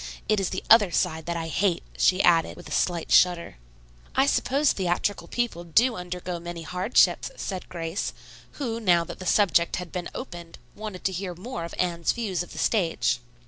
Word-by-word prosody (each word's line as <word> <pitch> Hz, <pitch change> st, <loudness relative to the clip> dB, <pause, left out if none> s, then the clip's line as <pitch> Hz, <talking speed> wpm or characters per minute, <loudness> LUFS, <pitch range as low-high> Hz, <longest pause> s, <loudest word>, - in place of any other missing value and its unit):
It 215 Hz, -, +2 dB
is 195 Hz, -, -1 dB
the 185 Hz, -, -4 dB
other 215 Hz, -4 st, +7 dB
side 160 Hz, -1 st, -1 dB
that 170 Hz, 0 st, -1 dB
I 165 Hz, -1 st, -3 dB
hate," 175 Hz, +1 st, 0 dB
she 185 Hz, +1 st, +3 dB
added, 165 Hz, -2 st, +3 dB
with 175 Hz, -, -11 dB
a -, -, -11 dB
slight 175 Hz, -2 st, 0 dB
shudder. 175 Hz, -, +4 dB, 0.6 s
"I 270 Hz, -, +4 dB
suppose 280 Hz, +1 st, +2 dB
theatrical 190 Hz, +2 st, -1 dB
people 235 Hz, -8 st, -2 dB
do 230 Hz, +9 st, +3 dB
undergo 180 Hz, -1 st, -5 dB
many 170 Hz, 0 st, -7 dB
hardships," 180 Hz, +7 st, +2 dB
said 190 Hz, -, -5 dB
Grace, 165 Hz, 0 st, -3 dB, 0.4 s
who, 230 Hz, -5 st, -3 dB
now 175 Hz, -6 st, +3 dB
that -, -, -9 dB
the 185 Hz, -, -6 dB
subject 175 Hz, -4 st, +3 dB
had 180 Hz, -1 st, -6 dB
been 180 Hz, -2 st, -4 dB
opened, 175 Hz, -9 st, -8 dB, 0.2 s
wanted 210 Hz, -3 st, -7 dB
to 190 Hz, -, +1 dB
hear 185 Hz, -1 st, -4 dB
more 180 Hz, -2 st, -6 dB
of 170 Hz, -, -8 dB
Anne's 170 Hz, -2 st, 0 dB
views 205 Hz, -7 st, -2 dB
of 175 Hz, -, -7 dB
the -, -, -10 dB
stage. 160 Hz, -, +1 dB
180 Hz, 185 wpm, -26 LUFS, 170-205 Hz, 0.6 s, other